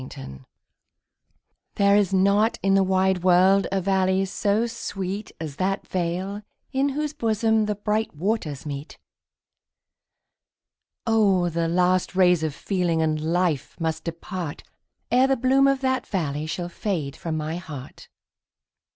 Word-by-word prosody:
There 200 0 +4
is 205 -3 +3
not 200 +4 +3
in 195 0 +3
the 195 - +5
wide 190 -1 +2
world 185 +1 +4
a 195 - +1
valley 190 0 +1
so 205 +3 0
sweet 200 -3 -5
As 155 -3 -6
that 195 +2 -1
vale 185 +3 -2 0.3
in 270 +1 +2
whose 300 -1 -2
bosom 220 -4 +1
the 210 - -1
bright 210 -1 -1
waters 160 - -2
meet; 145 +1 -6 2.1
Oh! 200 -6 +3
the 165 0 -1
last 180 +2 +1
rays 180 -3 +4
of 155 -3 -2
feeling 180 -3 -1
and 155 -1 0
life 165 -2 -1
must 160 -1 -2
depart, 170 -1 -5 0.5
Ere 255 +2 +5
the 270 0 +2
bloom 265 +3 +4
of 275 -1 +1
that 260 -1 0
valley 155 -6 -2
shall 175 +2 -3
fade 170 -6 -3
from 160 -2 -4
my 155 +2 -3
heart. 150 -7 -10
185 Hz, 135 wpm, -24 LUFS, 170-210 Hz, 2.1 s, the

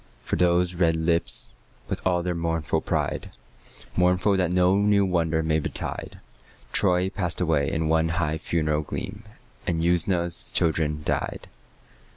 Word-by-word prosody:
For - - -1
those 90 0 +2
red 85 -2 +2
lips, 85 +1 +1 0.3
with - - -4
all 90 -1 +1
their 90 0 -1
mournful 80 -2 -1
pride, - - -2 0.7
Mournful 90 +3 +3
that 90 -3 +1
no 90 +1 +3
new 100 -1 +3
wonder 80 -3 0
may 80 0 +1
betide, 75 - -3 0.5
Troy 90 -1 +2
passed 90 -3 -3
away 80 -6 +1
in 80 0 -1
one 80 +1 +2
high 80 -2 -1
funeral 75 -2 0
gleam, 105 +7 -6 0.5
And 85 -2 0
Usna's 85 0 +1
children 75 -2 0
died. - - -2
85 Hz, 140 wpm, -25 LUFS, 80-90 Hz, 0.7 s, Mournful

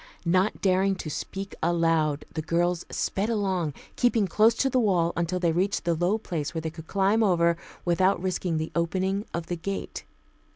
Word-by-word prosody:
Not 185 +5 +2
daring 190 0 +2
to 155 -4 -6
speak 195 +5 -5
aloud, 165 -3 +1
the 160 - -2
girls 175 +2 0
sped 200 +3 -1
along, 190 -9 -1 0.2
keeping 235 -4 +2
close 215 +5 +4
to 270 - +1
the 260 -1 +2
wall 180 -7 +2
until 170 +1 -1
they 170 -2 +2
reached 185 +2 0
the 170 - +2
low 175 +6 +1
place 165 -7 -4
where 160 - -1
they 160 - -3
could 160 -1 -11
climb 200 +3 +2
over 170 -5 +3 0.3
without 185 +3 +3
risking 180 -2 -1
the 155 0 -3
opening 190 +4 0
of 170 -1 -3
the 175 - -3
gate. 195 +4 -5
180 Hz, 180 wpm, -26 LUFS, 165-195 Hz, 0.3 s, close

